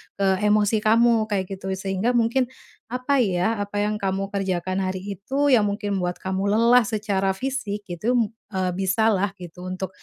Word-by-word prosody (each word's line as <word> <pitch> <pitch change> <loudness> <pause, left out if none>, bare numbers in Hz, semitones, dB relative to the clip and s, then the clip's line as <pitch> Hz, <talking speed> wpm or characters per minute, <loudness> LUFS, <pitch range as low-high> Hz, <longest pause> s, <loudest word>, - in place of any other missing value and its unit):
ke 190 -1 +1
emosi 210 +1 +3
kamu, 225 0 +3
kayak 195 -2 -2
gitu, 190 0 -6
sehingga 195 +5 -1
mungkin 240 +2 +2 0.4
apa, 255 +4 0
ya, 205 0 +1
apa 205 0 -2
yang 210 0 -1
kamu 195 0 -2
kerjakan 185 -2 -2
hari 185 0 -2 0.2
itu 275 +7 +1
yang 220 -4 +5
mungkin 205 -1 -2
membuat 180 0 -1
kamu 190 +1 -2
lelah 230 +3 +5
secara 205 -3 0
fisik, 240 -3 -3
gitu, 210 +8 -1 0.4
eee, 185 -1 0
bisa 195 +4 +2
lah 200 -1 +1
gitu, 180 -1 -10
untuk 185 +1 -4
200 Hz, 170 wpm, -23 LUFS, 190-225 Hz, 0.4 s, yang